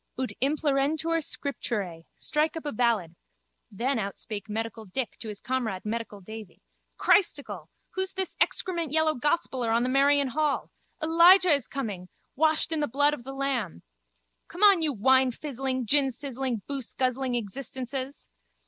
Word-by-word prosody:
Pflaap! 260 - -1
Ut 255 - -3
implerentur 300 +3 +1
scripturae. 205 - -4
Strike 310 +2 0
up 320 - -7
a 290 - -2
ballad. 220 -8 +1 0.6
Then 240 +5 -1
outspake 205 +1 -5
medical 225 +1 -3
Dick 225 +6 -4
to 225 - -6
his 210 -2 -5
comrade 230 -8 -3
medical 215 -2 -4
Davy. 220 +1 -10 0.3
Christicle, 215 - +1 0.2
who's 380 0 -2
this 380 -1 -3
excrement 340 -5 0
yellow 315 0 +3
gospeller 270 -3 -1
on 230 +1 +2
the 250 - 0
Merrion 280 +1 +4
hall? 300 +2 -1 0.3
Elijah 340 +2 +7
is 280 -5 +1
coming! 205 -9 -5 0.3
Washed 315 +2 +3
in 320 - 0
the 295 - 0
blood 290 +4 +3
of 295 - -6
the 270 - -6
Lamb. 270 - -2 0.6
Come 355 +5 -4
on 400 -4 +7
you 310 -2 +1
winefizzling, 260 +1 +1
ginsizzling, 265 -3 0
booseguzzling 260 -1 -1
existences! 260 +4 -5
265 Hz, 140 wpm, -27 LUFS, 230-300 Hz, 0.6 s, Elijah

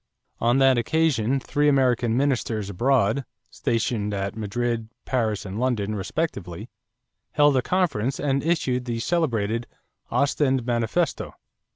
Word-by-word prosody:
On 120 +2 +3
that 135 -2 +5
occasion 135 -3 +1
three 145 +3 +1
American 125 -4 +2
ministers 120 -7 0
abroad, 125 +3 +2 0.3
stationed 110 -3 -1
at 100 0 -3
Madrid, 115 +1 -2 0.2
Paris, 110 -6 -1
and 100 +2 -5
London 115 -5 0
respectively, 100 - -4 0.6
held 145 -1 +4
a 130 - +3
conference 140 - 0
and 140 -1 0
issued 130 -6 0
the 120 -2 -2
celebrated 115 -7 0 0.4
"Ostend 135 -3 +1
Manifesto." 120 +7 -1
120 Hz, 115 wpm, -24 LUFS, 110-140 Hz, 0.6 s, that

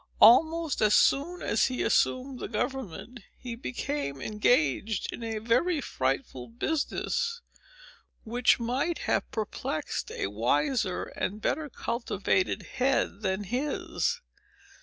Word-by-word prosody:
Almost 315 +6 +6
as 210 -1 +5
soon 340 +6 +3
as 225 - +2
he 255 -1 -2
assumed 255 0 +1
the - - -4
government, 240 - -4 0.2
he 245 -2 -6
became 245 - -3
engaged 210 - +1
in - - -7
a 225 -1 -3
very 245 +10 +2
frightful 130 - -2
business, 320 - -1 0.8
which 240 +3 +3
might 260 +8 -1
have - - 0
perplexed 215 -2 -3
a - - -3
wiser 145 - 0
and 205 +3 -4
better 295 +7 -1
cultivated 200 -7 -1 0.2
head 255 -5 +1
than 190 0 -1
his. 285 - -1
235 Hz, 115 wpm, -28 LUFS, 200-275 Hz, 0.8 s, Almost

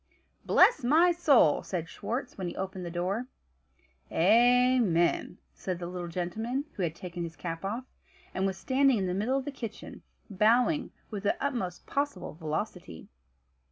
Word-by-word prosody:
"Bless 475 - +5
my 320 +8 +5
soul!" 285 - +4
said 170 -4 -4
Schwartz 250 +8 -5
when 185 -2 -4
he 175 - -5
opened 190 -1 -5
the 175 - -4
door. 185 +8 -2 0.8
"Amen," 230 -3 +3 0.2
said 185 -2 -4
the 175 - -6
little 175 0 -5
gentleman, 220 - -3
who - - -6
had 165 -3 -1
taken 175 0 -7
his 165 -1 -5
cap 165 +2 -5
off, 225 +6 -3 0.5
and 190 +1 0
was 190 -1 -3
standing 270 +1 +3
in 195 - -1
the 180 - -1
middle 220 +8 0
of 270 - -3
the 290 - -3
kitchen, 230 -6 -8 0.3
bowing 240 - +2 0.2
with 205 -2 -4
the 205 - 0
utmost 235 -11 -3
possible 285 +1 -2
velocity. 155 - -5
200 Hz, 155 wpm, -29 LUFS, 175-250 Hz, 0.8 s, Bless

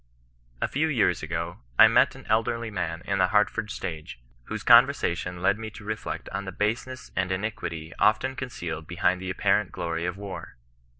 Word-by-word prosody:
A - - +2
few 155 +4 0
years 115 - +2
ago, 85 +2 -4 0.2
I - - +10
met - - +4
an - - -12
elderly 115 +1 0
man 85 -3 -3
in 100 0 0
the 95 - +4
Hartford 105 +1 +1
stage, 75 -11 -6 0.3
whose - - -5
conversation 90 +1 +4
led 100 +3 +3
me 110 -1 -5
to 110 0 -12
reflect 110 +1 -4
on 100 +1 -4
the 95 - -5
base 105 +7 -1
ness 130 0 -9
and 95 0 0
iniquity 85 -5 -4
often 130 +5 +3
concealed 85 -12 -5
behind 90 +1 +1
the 95 - -4
apparent 95 +1 +1
glory 85 0 -3
of 90 +1 -4
war. 100 -1 -7
95 Hz, 180 wpm, -26 LUFS, 85-110 Hz, 0.3 s, I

